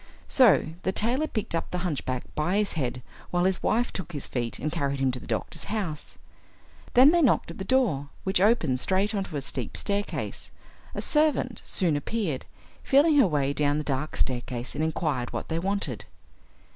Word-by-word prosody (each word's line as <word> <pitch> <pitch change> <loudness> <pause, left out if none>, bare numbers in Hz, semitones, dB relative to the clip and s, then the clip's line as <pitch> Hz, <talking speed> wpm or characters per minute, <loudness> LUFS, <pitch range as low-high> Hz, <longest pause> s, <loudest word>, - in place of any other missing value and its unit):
So 240 - +5
the 190 - 0
tailor 245 +10 +1
picked 215 - -3
up 165 - -2
the 180 - -3
hunchback 130 -6 -2
by 165 +6 0
his 210 -1 +1
head 125 -5 -3 0.3
while 175 0 +1
his 190 0 +1
wife 240 +2 +1
took 180 -3 -5
his 145 - -4
feet 120 -2 -3
and 155 - -3
carried 140 -4 -1
him 135 -1 +2
to 125 - -4
the - - -12
doctor's 110 -3 -3
house. 190 -9 -4 0.8
Then 260 +4 +8
they 345 0 +3
knocked 255 - +2
at 165 - -11
the - - -3
door, 190 - +1
which 190 -1 +1
opened 180 - +3
straight 195 - +1
on 200 -2 -1
to 160 - -8
a - - -2
steep - - -4
staircase. 205 0 -3 0.4
A - - -2
servant 300 -5 +1
soon 170 -6 +1
appeared, 155 - -2 0.3
feeling 290 +3 +4
her 270 - +6
way 140 -4 0
down 145 0 +1
the 150 - -2
dark 145 +1 -2
staircase 125 -1 -1
and 155 - -2
inquired 155 -6 -1
what - - -4
they 165 0 -1
wanted. 190 - -2
170 Hz, 190 wpm, -27 LUFS, 140-210 Hz, 0.8 s, Then